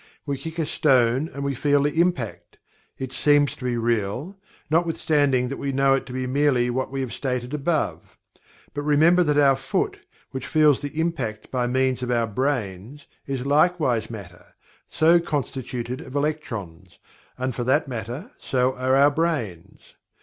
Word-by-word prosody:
We 140 Hz, -1 st, -1 dB
kick 160 Hz, +5 st, -7 dB
a 165 Hz, -, 0 dB
stone 130 Hz, 0 st, +2 dB
and 140 Hz, -, -6 dB
we 140 Hz, 0 st, -1 dB
feel 145 Hz, +2 st, +2 dB
the 150 Hz, +3 st, +2 dB
impact 170 Hz, -11 st, -2 dB, 0.4 s
it 130 Hz, -1 st, -5 dB
seems 145 Hz, +1 st, +3 dB
to -, -, -12 dB
be 120 Hz, -1 st, 0 dB
real, 115 Hz, -, -1 dB, 0.3 s
notwithstanding 150 Hz, -5 st, +2 dB
that 135 Hz, -, -4 dB
we 140 Hz, -, -2 dB
know 135 Hz, 0 st, +3 dB
it 135 Hz, -, -1 dB
to -, -, -8 dB
be 130 Hz, 0 st, -2 dB
merely 130 Hz, -2 st, +2 dB
what 130 Hz, +2 st, -2 dB
we 135 Hz, 0 st, -3 dB
have 130 Hz, -3 st, -4 dB
stated 125 Hz, -1 st, -3 dB
above. 150 Hz, +2 st, -2 dB, 0.6 s
But 145 Hz, -, -3 dB
remember 155 Hz, +5 st, +4 dB
that 150 Hz, -4 st, +2 dB
our 140 Hz, -2 st, +5 dB
foot, 135 Hz, 0 st, -2 dB, 0.3 s
which 130 Hz, 0 st, -5 dB
feels 150 Hz, -3 st, +4 dB
the 145 Hz, +2 st, -5 dB
impact 135 Hz, -11 st, -2 dB
by 125 Hz, -2 st, 0 dB
means 130 Hz, 0 st, +1 dB
of 125 Hz, -, -3 dB
our 120 Hz, -1 st, +2 dB
brains, 120 Hz, +1 st, -3 dB, 0.2 s
is 135 Hz, -2 st, -3 dB
likewise 145 Hz, -6 st, +2 dB
Matter, 95 Hz, -6 st, -11 dB, 0.3 s
so 165 Hz, +2 st, +4 dB
constituted 130 Hz, -5 st, -4 dB
of 130 Hz, -3 st, -10 dB
electrons, 105 Hz, -, -4 dB, 0.4 s
and 130 Hz, 0 st, -2 dB
for 120 Hz, -, -3 dB
that 140 Hz, +4 st, +2 dB
matter 125 Hz, -, -6 dB
so 130 Hz, 0 st, +1 dB
are 130 Hz, +1 st, +2 dB
our 140 Hz, +2 st, +5 dB
brains. 140 Hz, -, -3 dB
135 Hz, 165 wpm, -24 LUFS, 125-150 Hz, 0.6 s, our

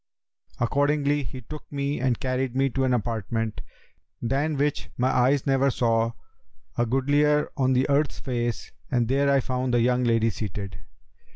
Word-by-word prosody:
Accordingly 145 Hz, +3 st, +1 dB
he 130 Hz, 0 st, -7 dB
took 150 Hz, +7 st, -10 dB
me 140 Hz, 0 st, -2 dB
and 125 Hz, -2 st, 0 dB
carried 130 Hz, -1 st, -1 dB
me 135 Hz, 0 st, +2 dB
to 135 Hz, +2 st, 0 dB
an 130 Hz, -, +1 dB
apartment, 115 Hz, -1 st, -2 dB, 0.6 s
than 140 Hz, +5 st, 0 dB
which 145 Hz, +1 st, -1 dB
my 125 Hz, +1 st, +2 dB
eyes 130 Hz, +2 st, +2 dB
never 135 Hz, 0 st, +3 dB
saw 115 Hz, -2 st, +1 dB, 0.6 s
a 120 Hz, -, +1 dB
goodlier 145 Hz, +4 st, +2 dB
on 130 Hz, -1 st, +2 dB
the 130 Hz, +1 st, +2 dB
earth's 145 Hz, +1 st, +1 dB
face 120 Hz, -3 st, -3 dB, 0.2 s
and 120 Hz, -2 st, +1 dB
there 140 Hz, +3 st, +2 dB
I 140 Hz, -1 st, +4 dB
found 125 Hz, 0 st, -1 dB
the -, -, +4 dB
young 125 Hz, +1 st, +2 dB
lady 115 Hz, -1 st, +2 dB
seated. 100 Hz, -3 st, -5 dB
130 Hz, 160 wpm, -25 LUFS, 120-140 Hz, 0.6 s, I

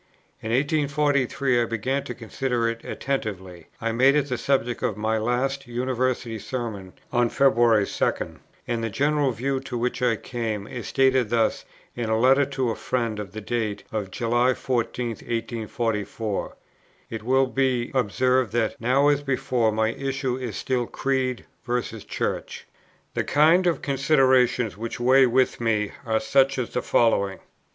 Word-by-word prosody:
In 110 Hz, -, -5 dB
1843 140 Hz, -2 st, +1 dB
I -, -, +2 dB
began 115 Hz, +5 st, -2 dB
to 125 Hz, -, -6 dB
consider 120 Hz, +1 st, -2 dB
it 115 Hz, 0 st, -3 dB
attentively; 95 Hz, -10 st, -4 dB
I 115 Hz, 0 st, -1 dB
made 130 Hz, +5 st, +4 dB
it 145 Hz, -1 st, +1 dB
the 125 Hz, -, -1 dB
subject 125 Hz, -4 st, 0 dB
of 105 Hz, -, -1 dB
my 110 Hz, +1 st, 0 dB
last 130 Hz, +4 st, -1 dB
University 125 Hz, -1 st, -1 dB
Sermon 105 Hz, -7 st, -5 dB, 0.2 s
on 120 Hz, -1 st, +3 dB
February 120 Hz, -6 st, +4 dB
2; -, -, -2 dB, 0.3 s
and 115 Hz, -1 st, -1 dB
the 115 Hz, -, -1 dB
general 145 Hz, +5 st, +1 dB
view 130 Hz, +3 st, -1 dB
to 125 Hz, -2 st, -5 dB
which 125 Hz, +2 st, -2 dB
I 125 Hz, -2 st, +3 dB
came 110 Hz, -3 st, -4 dB
is 120 Hz, 0 st, -7 dB
stated 130 Hz, -4 st, +2 dB
thus 115 Hz, -1 st, +1 dB, 0.3 s
in 120 Hz, -2 st, -3 dB
a 110 Hz, -, +2 dB
letter 135 Hz, +4 st, +5 dB
to 130 Hz, -3 st, -1 dB
a -, -, -3 dB
friend 115 Hz, -4 st, -2 dB
of 100 Hz, -3 st, -7 dB
the 110 Hz, -, -6 dB
date 110 Hz, -2 st, -2 dB
of 105 Hz, -3 st, -3 dB
July 120 Hz, +4 st, +1 dB
14, 125 Hz, -1 st, -2 dB
1844; 115 Hz, -2 st, -3 dB, 0.6 s
it 115 Hz, -, -4 dB
will 130 Hz, +4 st, +3 dB
be 130 Hz, -2 st, 0 dB
observed 125 Hz, -1 st, +1 dB
that, 115 Hz, -2 st, -1 dB
now 130 Hz, +5 st, +3 dB
as 145 Hz, -1 st, +3 dB
before, 130 Hz, -4 st, 0 dB
my 110 Hz, +1 st, +1 dB
issue 135 Hz, +1 st, -2 dB
is 125 Hz, -5 st, -5 dB
still 125 Hz, -2 st, -1 dB
Creed 130 Hz, -2 st, -1 dB, 0.2 s
versus 120 Hz, -3 st, -3 dB
Church: -, -, -4 dB, 0.5 s
"The -, -, 0 dB
kind 165 Hz, +5 st, +4 dB
of 170 Hz, -, 0 dB
considerations 130 Hz, -, +3 dB
which 115 Hz, +4 st, -5 dB
weighs 130 Hz, +2 st, +5 dB
with 130 Hz, 0 st, +1 dB
me 105 Hz, -3 st, +1 dB, 0.2 s
are 110 Hz, 0 st, +2 dB
such 135 Hz, +4 st, +2 dB
as 125 Hz, -3 st, -2 dB
the 125 Hz, -, -1 dB
following: 100 Hz, -4 st, +2 dB
1. -, -, -24 dB
120 Hz, 160 wpm, -24 LUFS, 115-135 Hz, 0.6 s, letter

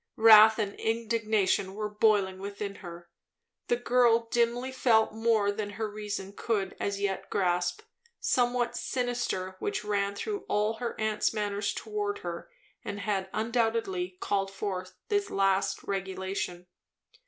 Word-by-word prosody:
Wrath 220 Hz, -1 st, +8 dB
and 205 Hz, -3 st, -1 dB
indignation 220 Hz, -4 st, 0 dB
were 210 Hz, 0 st, -2 dB
boiling 205 Hz, -3 st, +2 dB
within 200 Hz, +1 st, -5 dB
her. 170 Hz, -2 st, -10 dB, 0.6 s
The 240 Hz, -, +3 dB
girl 240 Hz, -1 st, +3 dB
dimly 240 Hz, +2 st, +1 dB
felt 230 Hz, -4 st, +3 dB
more 220 Hz, -2 st, +2 dB
than 205 Hz, 0 st, -4 dB
her 220 Hz, -1 st, -1 dB
reason 205 Hz, -2 st, -5 dB
could 200 Hz, -3 st, -2 dB
as 200 Hz, 0 st, -2 dB
yet 200 Hz, -1 st, -2 dB
grasp; 180 Hz, -, 0 dB, 0.4 s
somewhat 245 Hz, -1 st, +1 dB
sinister 240 Hz, -9 st, -2 dB
which 210 Hz, -, -2 dB
ran 200 Hz, -1 st, 0 dB
through 410 Hz, -, -4 dB
all 210 Hz, +2 st, +1 dB
her 240 Hz, 0 st, -4 dB
aunt's 215 Hz, +1 st, 0 dB
manner 205 Hz, -1 st, -2 dB
towards 205 Hz, 0 st, -2 dB
her 170 Hz, -1 st, -6 dB, 0.3 s
and 205 Hz, 0 st, -5 dB
had 195 Hz, -3 st, -1 dB
undoubtedly 225 Hz, -5 st, -1 dB
called 195 Hz, -1 st, 0 dB
forth 190 Hz, -2 st, -5 dB
this 405 Hz, -1 st, +1 dB
last 195 Hz, 0 st, +1 dB
regulation. 190 Hz, -2 st, -3 dB
210 Hz, 130 wpm, -29 LUFS, 195-225 Hz, 0.6 s, Wrath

